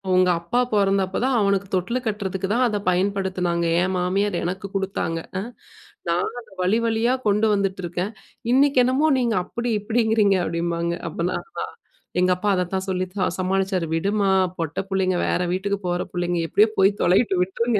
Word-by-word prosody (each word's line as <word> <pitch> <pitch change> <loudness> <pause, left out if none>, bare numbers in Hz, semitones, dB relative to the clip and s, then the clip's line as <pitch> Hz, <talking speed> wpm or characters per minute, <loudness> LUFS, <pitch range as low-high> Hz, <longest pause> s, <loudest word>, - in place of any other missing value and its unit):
உங்க 185 0 +4
அப்பா 175 +9 -1
பொறந்தப்போ 195 -2 +2
தான் 260 -2 +2
அவனுக்கு 200 -1 +1
தொட்டிலு 195 +8 0
கட்டுறதுக்கு 195 -2 -2
தான் 250 +2 +3
அத 210 -3 -1
பயன்படுத்தினாங்க. 185 -2 0 0.2
என் 190 - -1
மாமியார் 190 +2 0
எனக்கு 185 +3 -3
கொடுத்தாங்க. 195 -4 -1 0.2
அ - - -2 0.7
நான் 170 +1 +1
அத 235 - -14
வழி 190 +5 +3
வழியா 230 +2 +2
கொண்டு 210 +2 +3
வந்துட்டுருக்கேன். 190 -1 -2 0.4
இன்னைக்கு 275 0 +4
என்னமோ 270 +5 +2
நீங்க 235 -4 +1
அப்படி 235 0 -4
இப்படிங்கிறீங்க!" 220 -2 +2
அப்படிம்பாங்க. 170 0 -1 0.2
அப்பலாம் 170 +3 -2
அதான், - - -6 0.5
எங்க 180 0 +3
அப்பா 205 +3 -1
அதத்தான் 185 +1 -1
சொல்லித்தான் 185 0 -1
சமாளிச்சாரு. 190 -2 0
"விடுமா 200 +3 +1 0.3
பொட்ட 165 -2 -2
புள்ளைங்க 190 -2 +1
வேற - - +1
வீட்டுக்கு 200 +2 -1
போற 175 0 0
புள்ளைங்க, 175 -1 -1
எப்படியோ 215 +2 +4
போய் 195 +1 +5
தொலையட்டும் 185 0 +3
விட்ருங்க. 220 +4 0
195 Hz, 150 wpm, -23 LUFS, 180-210 Hz, 0.7 s, போய்